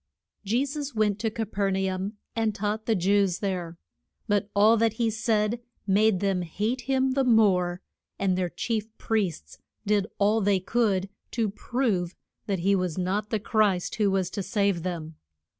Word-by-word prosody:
JE 235 +7 +1
SUS 285 -1 -5
went 210 -2 +1
to 225 +1 0
Ca 225 +1 -3
per 200 -1 -1
na 190 0 0
um 190 +3 -3 0.2
and 225 -2 0
taught 215 +2 -2
the 225 - +3
Jews 195 0 +2
there. 180 -4 -3 0.5
But 205 -1 +1
all 215 +3 +6
that 225 -1 +2
he 225 0 0
said 220 0 0 0.3
made 205 -1 +3
them 195 -2 +1
hate 210 +9 -2
him 265 0 +2
the 270 +1 +2
more, 190 -7 +3 0.3
and 190 -2 +1
their 180 -1 -1
chief 220 +3 -2
priests 175 - -2 0.3
did 205 -1 +2
all 210 +2 +3
they 200 -1 +3
could 200 -1 +1 0.3
to 225 -4 0
prove 205 -6 -1 0.3
that 195 -4 -1
he 195 +3 +3
was 180 -3 -1
not 195 +4 -1
the 220 - 0
Christ 205 -4 +1
who 210 -2 +3
was 190 -2 0
to 200 - -3
save 200 -2 0
them. 165 -3 -5
205 Hz, 175 wpm, -26 LUFS, 185-220 Hz, 0.5 s, all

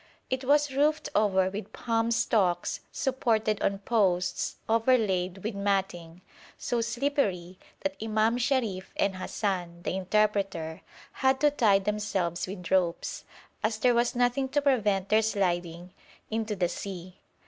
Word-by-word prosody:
It 260 +1 -1
was 290 0 +3
roofed 300 +3 +1
over 190 -3 +2
with 205 +2 -7
palm 230 -1 0
stalks 195 -6 +1
supported 230 -6 0
on 195 - +1
posts 190 -4 0
overlaid 210 -6 +1
with 220 +2 -2
matting, 190 -4 -2 0.4
so 240 -1 -1
slippery 230 - -1 0.2
that 290 0 -2
Imam 220 +2 +1
Sharif 235 -8 -1
and 190 -1 +1
Hassan, 180 -3 -3
the - - -2
interpreter, 195 -4 0 0.3
had 265 0 +1
to 295 -1 +5
tie 220 -8 +4
themselves 195 -4 -2
with 180 -3 -7
ropes, 180 -3 0 0.4
as 215 +1 0
there 245 +2 +3
was 240 +1 +1
nothing 245 +2 +1
to 290 +2 +1
prevent 210 -8 +2
their 215 +1 +5
sliding 180 -4 -1 0.4
into 220 -1 -1
the 180 -2 +1
sea. 185 -1 -7
210 Hz, 135 wpm, -28 LUFS, 185-240 Hz, 0.4 s, to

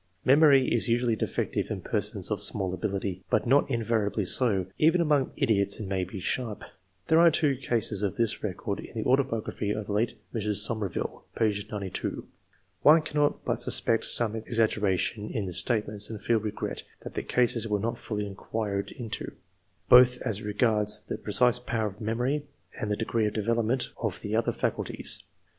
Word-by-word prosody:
Memory 140 -1 +5
is 120 0 +5
usually 120 0 +1
defective - - -2
in - - -3
persons - - -1
of - - -1
small 95 -2 +2
ability, 95 -1 -3
but 105 - +1
not 140 +4 +3
invariably 110 -4 -1
so; 100 -3 +3
even 165 +3 +4
among 150 -5 +1
idiots 100 -3 +1
it 105 - -5
may 95 -1 -1
be 95 +2 -7
sharp. 110 +2 -3 0.4
There 160 - +4
are 170 0 +7
two 150 -3 +1
cases 115 -5 +1
of 100 -3 -1
this 115 -2 0
recorded 100 0 -4
in - - -16
the 110 - -2
autobiography 125 -6 0
of 105 0 -2
the 105 - -6
late 110 +4 0 0.2
Mrs. 105 -2 -1
Somerville 105 -6 -3
(p. 110 -2 +2 0.2
92.) 100 -3 -4 0.5
One 155 +2 +6
cannot 150 -2 -1
but - - -1
suspect 115 - +2
some 115 -2 +4
ex 115 +1 -4
aggeration 105 -1 0
in 110 -6 -3
the 90 - -5
statements, 105 +1 +1
and 110 -2 -6
feel 115 +1 +1
regret 105 0 -4 0.2
that - - -9
the - - -2
cases 120 -2 +1
were 105 -1 0
not 115 +3 -3
fully 105 -7 -4
inquired 100 0 -4
into, 115 -4 -6 0.5
both 125 0 +7
as 105 -1 -2
regards 105 0 +1
the - - -5
precise 125 +3 +2
power 115 -3 -2
of 105 +1 -6
memory, 125 +7 -1 0.3
and 105 - -3
the 105 - -1
degree 110 -1 0
of 105 - -5
development 115 +3 0
of 105 -6 -2
the 105 +1 -3
other 115 - +1
faculties. - - -2
110 Hz, 175 wpm, -27 LUFS, 105-125 Hz, 0.5 s, are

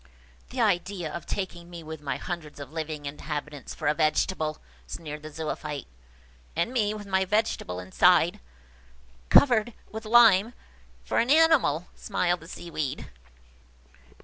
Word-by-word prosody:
"The 255 - -6
idea 185 -5 0
of 170 - -6
taking 175 -3 -4
me 170 -2 -9
with 160 -1 -8
my 140 -3 -2
hundreds 160 -5 -6
of 140 -1 -8
living 155 -2 -4
inhabitants 150 0 -5
for 155 - -3
a 150 - +4
vegetable!" 155 0 +1 0.3
sneered 150 -2 -7
the 155 - -8
Zoophyte. 150 -2 -4 0.7
"And 170 +9 0
me 215 -4 +1
with 210 -1 -7
my 190 -1 +1
vegetable 190 - -1
inside, 90 0 +3 0.9
covered 240 -5 +6
over 235 - -19
with 220 +1 -7
lime, 225 -1 +6 0.5
for - - 0
an 235 - +1
animal!" 295 - +4
smiled 175 0 0
the 165 - -13
Seaweed. 155 -6 -5
170 Hz, 140 wpm, -27 LUFS, 150-210 Hz, 0.9 s, covered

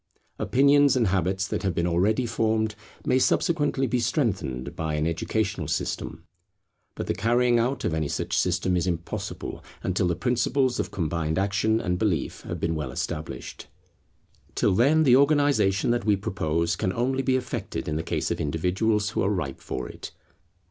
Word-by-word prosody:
Opinions 140 +1 +4
and 125 -3 +3
habits 95 +1 0
that - - -2
have 95 -4 -1
been 85 - +1
already 100 +8 +2
formed 110 -1 0 0.3
may 130 - +3
subsequently 145 -1 +1
be 125 0 0
strengthened 95 - -1
by 80 -1 -2
an 75 0 0
educational 85 0 -1
system; 80 +3 -3 0.7
but - - -4
the - - 0
carrying 120 +5 +2
out 125 +3 -1
of 80 - 0
any 80 -2 0
such - - -2
system 90 -1 +1
is 90 0 0
impossible, 85 -1 -4 0.2
until 95 0 +1
the 85 - 0
principles 125 +4 +1
of - - -1
combined 80 -2 -2
action 100 +3 +1
and 90 -5 -1
belief 95 -10 -1
have - - -6
been 80 - 0
well 75 -5 -3
established. 75 +4 -5 0.9
Till - - +2
then 140 +10 +4
the 130 -4 +6
organization 140 -8 +3
that 120 0 0
we 105 -2 +4
propose 85 -4 -1
can 95 - -1
only 130 +5 0
be 130 -1 +1
effected 125 -1 -4
in 75 - -1
the 80 - -1
case 80 - -2
of - - -2
individuals 95 +8 0
who - - -1
are 95 - +2
ripe 80 -10 -3
for 65 -1 -4
it. - - -8
100 Hz, 170 wpm, -26 LUFS, 85-125 Hz, 0.9 s, the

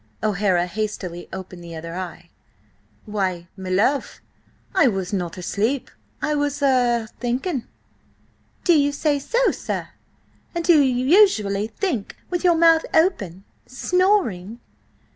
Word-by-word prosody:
O'Hara 195 -4 +2
hastily 180 -2 -4
opened 185 -2 -8
the 170 -1 -8
other 165 +1 -7
eye. 175 -1 -7 0.7
"Why, 190 -5 -2
my 190 -2 -7
love, 220 +10 +1 0.5
I 375 -7 +5
was 195 -4 -2
not 175 -3 -2
asleep! 220 +9 -1 0.3
I 300 - +1
was–er–thinking!" 255 - 0 1.0
"Do 350 - +5
you 285 -2 +3
say 290 0 +1
so, 480 - +2
sir? - - -4 0.7
And 340 -1 -2
do 330 -4 +6
you 255 -2 +1
usually 220 - +4
think 245 - -3
with 355 0 -1
your 350 -2 +5
mouth 330 -1 +5
open–snoring?" 255 - 0
235 Hz, 115 wpm, -22 LUFS, 190-300 Hz, 1.0 s, do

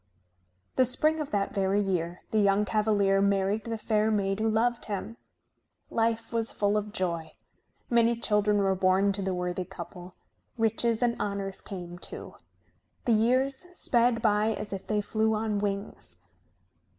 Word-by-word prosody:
The 255 - +5
spring 305 +6 +1
of 300 -2 -3
that 200 -1 -1
very 195 0 +1
year 180 -3 -1
the 220 - +2
young 200 0 +3
cavalier 205 -2 +2
married 200 +1 +1
the 230 -1 -3
fair 215 0 +1
maid 195 -2 0
who 220 +1 +1
loved 235 +2 +1
him. 210 +2 -5 0.7
Life 230 0 0
was 230 -1 +1
full 205 0 +1
of 210 0 -1
joy. 170 -6 -3 0.5
Many 235 0 +3
children 210 -2 +2
were 195 -1 +2
born 190 +1 +3
to 200 0 -2
the 190 -1 -1
worthy 180 +1 -2
couple. 180 0 -10 0.4
Riches 225 +1 +2
and 235 -1 +2
honors 200 -1 -3
came, 175 -3 -7
too. - - -5 0.7
The 235 - +3
years 260 +8 +2
sped 235 -7 +2
by 215 0 +3
as 210 -1 -5
if 195 - -6
they 210 -1 +1
flew 220 +1 +1
on 215 -1 -1
wings. 200 0 -4
210 Hz, 155 wpm, -28 LUFS, 195-225 Hz, 0.7 s, The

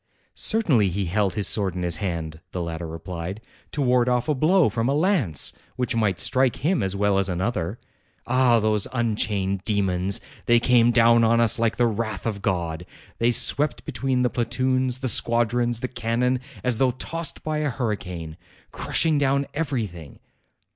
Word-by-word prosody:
"Certainly, 145 - +2
he 95 +2 -2
held 95 +2 0
his 105 - -1
sword 95 -4 -1
in 90 - -3
his 85 -2 0
hand," 80 -5 -4
the 90 - -3
latter 85 0 -5
replied, 85 +4 -6 0.3
"to 145 - -1
ward 125 -1 +3
off 125 +1 0
a 155 - +2
blow 160 +6 +3
from 115 +2 -1
a 140 - +1
lance, 150 - +1 0.2
which 125 -2 -2
might 105 -5 +1
strike 130 -2 +1
him 180 -2 +2
as 95 0 -2
well 100 -1 +2
as 95 0 -1
another. 90 +1 -2 0.5
Ah! 125 -1 +3
those 105 -2 +1
unchained 105 -5 -1
demons! 95 -3 +1 0.3
They 120 0 +5
came 120 -1 +4
down 115 0 +5
on 115 +1 +3
us 115 +1 +3
like 115 -1 +1
the 120 - +3
wrath 110 -2 -2
of 105 -3 -3
God. 85 -3 -2 0.3
They 115 - +3
swept 145 +4 +1
between 130 -2 -1
the 125 - +1
platoons, 130 +1 0
the 130 0 -3
squadrons, 120 +1 +1
the 130 - -1
cannon, 125 +1 -1 0.2
as 125 -3 0
though 130 - +4
tossed 165 +4 -4
by 155 -1 -2
a 150 -1 0
hurricane, 90 - -4 0.3
crushing 160 -3 +1
down 140 0 +1
everything. 110 - -4
115 Hz, 170 wpm, -24 LUFS, 95-130 Hz, 0.5 s, They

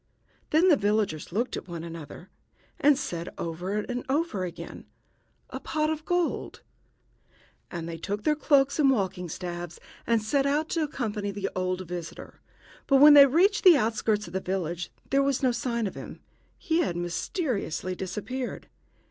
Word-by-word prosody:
Then 330 +5 +4
the 320 - +7
villagers 205 - 0
looked 235 +7 -1
at - - -7
one 170 -2 -6
another, 165 +1 -9 0.5
and 290 -1 +5
said 170 - -4
over 175 +5 -3
and 245 +4 -3
over 285 - 0
again, 175 -2 -8 0.6
"A - - -5
pot 310 0 -1
of 310 0 -4
gold!" 355 -2 -1 1.1
And 170 -2 -5
they 165 -1 -5
took 205 +5 -4 0.2
cloaks 280 -1 +3
and 280 -2 +5
walking 190 -7 0
staves 175 0 -6 0.3
and 230 -1 +3
set 270 +6 +1
out 300 +3 0
to 330 - 0
accompany 220 -9 -2
the 200 0 -3
old 185 0 -2
visitor; 175 -1 -8 0.5
but 275 - +4
when 290 +2 +9
they 280 -1 +10
reached 370 +9 +3
the 360 -5 +8
outskirts 220 -2 0
of 170 - -11
the 190 - 0
village 175 -2 -3 0.2
there 275 0 +4
was 275 -1 0
no 255 - +4
sign 235 -1 -2
of 195 - -3
him. - - -9 0.4
He 330 -2 0
had 225 - 0
mysteriously 185 - -2
disappeared. 210 +8 -5
215 Hz, 160 wpm, -27 LUFS, 180-280 Hz, 1.1 s, they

